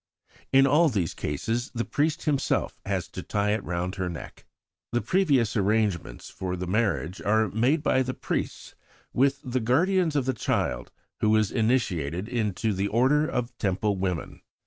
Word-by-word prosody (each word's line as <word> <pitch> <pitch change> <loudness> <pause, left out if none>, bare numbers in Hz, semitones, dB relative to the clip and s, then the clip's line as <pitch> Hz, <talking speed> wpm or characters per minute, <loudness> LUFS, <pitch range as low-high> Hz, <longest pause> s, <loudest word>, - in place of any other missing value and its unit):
In 135 0 +6
all 150 +4 +4
these 95 - -1
cases 115 - -2
the 115 - -1
priest 155 +3 0
himself 140 -3 0
has - - -1
to - - -6
tie 105 0 0
it 105 -1 -1
round 90 +2 -2
her 95 -1 -1
neck. 85 - -9 0.5
The 120 - +1
previous 140 - +2
arrangements 100 - 0
for 90 -1 -4
the 90 0 -4
marriage 95 -3 -1
are 110 +1 +2
made 125 - +1
by 130 - +3
the 130 0 -2
priests - - -4 0.4
with 135 +2 +2
the 130 -2 -1
guardians 160 +8 +2
of 140 -3 +1
the 130 - +1
child 60 - -1 0.3
who 110 0 +3
is 110 -2 +2
to - - -11
be - - -1
initiated 95 - 0
into 110 -3 -1
the 95 +1 -1
order 135 +8 +3
of 120 0 -3
Temple 100 +1 0
women. 90 -4 -3
110 Hz, 170 wpm, -26 LUFS, 95-130 Hz, 0.5 s, In